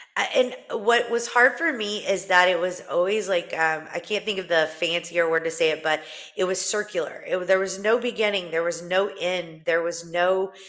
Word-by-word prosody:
I - - +1 0.5
and - - -4
What 235 0 +4
was 235 0 0
hard 245 +2 +5
for 330 -1 +1
me, 210 -4 -3
is 195 -1 -1
that 180 -1 +7
it 180 -2 +2
was 180 +1 -3
always, 195 +3 0
like, 175 -3 -2
um 160 -1 +1
I - - -5
can't 205 +2 -4
think 210 -3 -2
of 185 - -8
the 160 -2 +3
fancier 170 0 0
word 165 0 +1
to 165 - -1
say 160 -1 +2
it, 155 - -5
but, 155 0 +1 0.3
it 185 - -1
was 185 0 0
circular, 210 +2 -3
it - - -1
wa 180 - -5
there 190 0 +4
was 190 0 -3
no 220 +4 +2
beginning, 210 -7 -1
there 165 +1 0
was 170 -1 -3
no 185 +3 0
end, 175 -3 -4
there 165 +1 +2
was 170 0 -5
no 185 +2 +1
185 Hz, 230 wpm, -24 LUFS, 170-205 Hz, 0.5 s, that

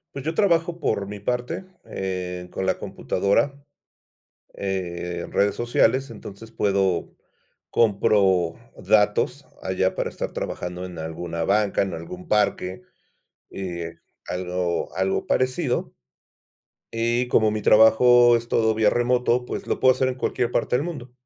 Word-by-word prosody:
Pues 135 -1 -6
yo 160 - -1
trabajo 170 -3 +2
por 100 - 0
mi 105 0 -8
parte, 125 - -2 0.2
eh, 90 -1 -4
con 95 - -3
la 95 - +1
computadora, 115 +9 -1 0.9
eh, 90 -3 -3
redes 100 0 +2
sociales, 120 +2 +2
entonces 110 0 -10
puedo 95 -5 0 0.5
compro 95 -5 +3 0.2
datos 105 +7 +2 0.2
allá 95 0 0
para - - -1
estar - - -5
trabajando 90 0 -4
en 90 -2 -9
alguna 80 +1 -4
banca, 105 +1 +2
en 95 -2 -4
algún 175 - -8
parque, 100 - 0 0.7
eh, 85 -3 -5 0.3
algo 90 -1 -2
algo 95 0 0
parecido. 130 +1 0 1.0
Eh, 120 +2 0
como 110 -1 +4
mi 105 0 -2
trabajo 120 +3 +6
es 115 0 -4
todo 110 -1 +2
vía 110 -1 +3
remoto, 125 0 +1
pues - - -5
lo - - -2
puedo 130 0 +6
hacer 130 0 +1
en 130 - -2
cualquier 120 -1 -1
parte 120 - +1
del 135 - -1
mundo. 140 -8 -7
105 Hz, 135 wpm, -24 LUFS, 95-125 Hz, 1.0 s, trabajo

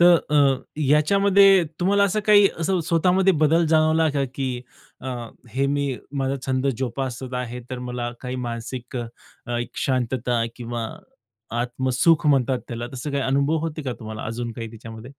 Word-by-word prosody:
तर 175 0 +8 0.2
अ, 140 -3 +3 0.2
याच्यामध्ये 195 +6 +5 0.2
तुम्हाला 200 +3 +3
असं 200 +2 +1
काही 205 -1 +7
असं 180 +2 +1
स्वतःमध्ये 180 +3 +3
बदल 165 +2 +4
जाणवला 160 0 +3
का, 140 -1 0
की 130 -3 -2 0.4
अ, 130 - -6 0.4
हे 135 +5 0
मी 140 -1 0 0.2
माझा 135 0 0
छंद 130 0 0
जोपासत 130 0 -4
आहे, 125 -1 -4
तर 130 - -4
मला 125 -1 -4
काही 125 0 -4
मानसिक 120 +2 -6
अ, 120 -1 -3 0.5
एक 120 0 -4 0.2
शांतता 125 -2 0
किंवा 120 -2 -4 0.7
आत्मसुख 130 +6 +2
म्हणतात 135 -3 +3
त्याला. 120 0 -4
तसं 130 +3 -5
काही 140 -1 -1
अनुभव 140 +4 +1
होते 160 -1 -4
का 130 -3 -3
तुम्हाला 110 0 -6
अजून 115 +1 -4
काही 115 0 -6
त्याच्यामध्ये? 115 +2 -10
135 Hz, 155 wpm, -23 LUFS, 120-160 Hz, 0.7 s, तर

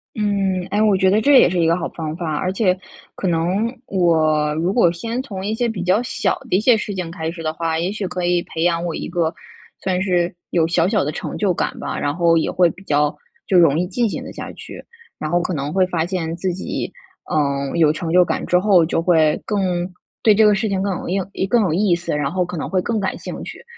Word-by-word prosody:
嗯， 195 -3 0
哎， 210 - +1
我 210 -3 +4
觉 190 0 +3
得 210 +3 +3
这 285 +5 +4
也 - - +5
是 180 0 -1
一 165 - +3
个 165 +1 +3
好 - - -3
方 155 -2 -5
法， 165 -3 -3
而 185 +4 -1
且 190 -2 +1 0.4
可 190 - -3
能 180 +7 0
我 155 -6 +2
如 170 +5 0
果 205 -8 +4
先 230 +8 -4
从 195 -8 -6
一 210 - -1
些 235 +1 0
比 200 -5 -4
较 185 +5 +2
小 210 -5 -1
的 - - +2
一 - - +2
些 235 +3 +5
事 210 -1 -3
情 180 -3 -4
开 160 -1 -4
始 165 -1 -8
的 155 0 -1
话， 160 0 -1
也 175 +3 -1
许 205 -2 -3
可 180 0 -4
以 175 0 +2
培 160 - -4
养 170 -1 +1
我 170 -2 -3
一 - - -5
个 170 -2 -1 0.5
算 185 -1 0
是 180 -3 +1 0.2
有 165 -2 +2
小 170 0 +2
小 210 0 +1
的 145 - -2
成 155 - -5
就 200 -3 +1
感 - - -2
吧， - - -4
然 145 0 -1
后 170 -1 +3
也 160 - 0
会 180 -1 +3
比 195 - -15
较 150 -3 +1 0.3
就 190 - +3
容 160 -3 +4
易 180 - +1
进 225 +5 0
行 - - -5
得 - - -9
下 - - -7
去， - - -10 0.4
然 155 - -3
后 175 +2 +2
可 180 - -2
能 145 -1 -3
会 185 +2 +3
发 170 -3 -1
现 170 -3 -3
自 185 +2 -2
己， 185 - -4 0.4
嗯， 140 -2 0
有 155 -2 +4
成 160 +1 -4
就 180 +1 +5
感 - - -2
之 180 - +3
后， 185 -2 +4
就 160 - 0
会 160 -4 +3
更 205 -2 -1 0.6
对 215 - +6
这 215 +2 +4
个 210 -1 +5
事 215 +3 -1
情 195 -2 -1
更 200 0 0
有 - - -7
硬 190 +2 0
一 - - -1
更 230 +4 +3
有 190 -6 +1
意 180 +2 +2
思， 170 -3 -3
然 145 -1 -1
后 185 +1 0
可 175 0 -6
能 - - -3
会 185 -1 0
更 225 +3 -1
感 190 -2 -2
兴 - - -7
趣。 - - -9
180 Hz, 280 characters per minute, -20 LUFS, 165-195 Hz, 0.6 s, 对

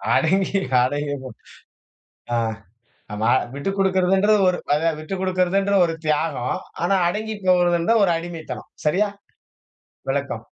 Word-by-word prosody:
அடங்கி 195 +3 +2 0.2
அடங்கி 145 +2 -1
போ 130 - -7 1.0
அ, - - +2 0.8
ஆமா 110 +2 +1 0.2
விட்டுக்குடுக்கிறதுன்றது 195 +4 +2
ஒரு 180 - +1 0.4
விட்டுக்குடுக்கிறதுன்றது 190 +3 0
அது, 180 - +6
ஒரு 165 - -2
தியாகம். 150 -5 0 0.3
ஆனா, 195 - +2
அடங்கிப்போகுறதுன்றது 185 -1 +1
ஒரு 175 - +2
அடிமைத்தனம். 165 -1 -7 0.2
சரியா? 195 +8 +2 1.0
விளக்கம். - - -3
180 Hz, 95 wpm, -22 LUFS, 160-195 Hz, 1.0 s, அது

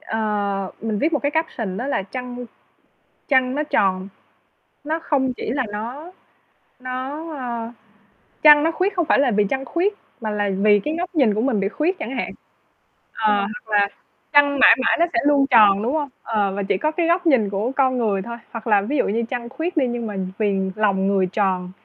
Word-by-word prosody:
Ờ, 205 -3 -2
mình 220 -2 -2
viết 315 +6 0
một 295 - +2
cái 285 - +1
caption 240 - -2
đó 245 - -4
là 280 - -1
trăng 245 +3 -7 0.8
trăng 260 -2 +2
nó 300 - 0
tròn, 190 -9 0 0.8
nó 315 +2 -1
không 270 -5 0
chỉ - - -4
là 260 +1 -1
nó 255 +12 -6 0.7
nó, 260 +5 -5
a 235 -2 -5 0.7
trăng 295 -1 +8
nó 325 - +2
khuyết 375 +4 -1
không 345 -3 +1
phải - - +3
là 275 -3 +3
vì 210 -1 +2
trăng 270 0 -1
khuyết, 355 - 0 0.3
mà 220 -2 -3
là 205 -1 -1
vì 205 0 +4
cái 305 - -2
góc 355 0 -4
nhìn 250 -9 +3
của 215 - -1
mình 240 -5 +1
bị 195 - 0
khuyết 325 - -1
chẳng 250 +4 -5
hạn. 245 - -3 0.8
Ờ, 215 -2 +1
hoặc 210 +2 -4
là 200 0 +3 0.4
trăng 285 -1 +4
mãi 230 - +8
mãi - - +3
nó 340 - +5
sẽ - - +2
luôn 285 -2 +4
tròn, 210 -5 +6
đúng 240 +4 -1
không? 295 -3 -1
Ờ, 205 -4 0
và 200 +1 -3
chỉ 195 - 0
có 310 - 0
cái 330 +1 -1
góc 345 +1 +1
nhìn 240 -10 +3
của 205 +6 -2
con 260 -2 +2
người 205 -5 0
thôi, 235 +4 -7
hoặc 230 0 -8
là 205 -3 +3
ví 280 +9 -2
dụ - - +2
như 225 +3 0
trăng 240 -2 -4
khuyết 325 +8 -4
đi 270 -5 +3
nhưng 240 -1 -3
mà 210 - -5 0.2
vì 200 -3 +1 0.2
lòng 195 -3 +1
người 195 -2 +2
tròn 185 -3 0
240 Hz, 210 wpm, -21 LUFS, 205-290 Hz, 0.8 s, trăng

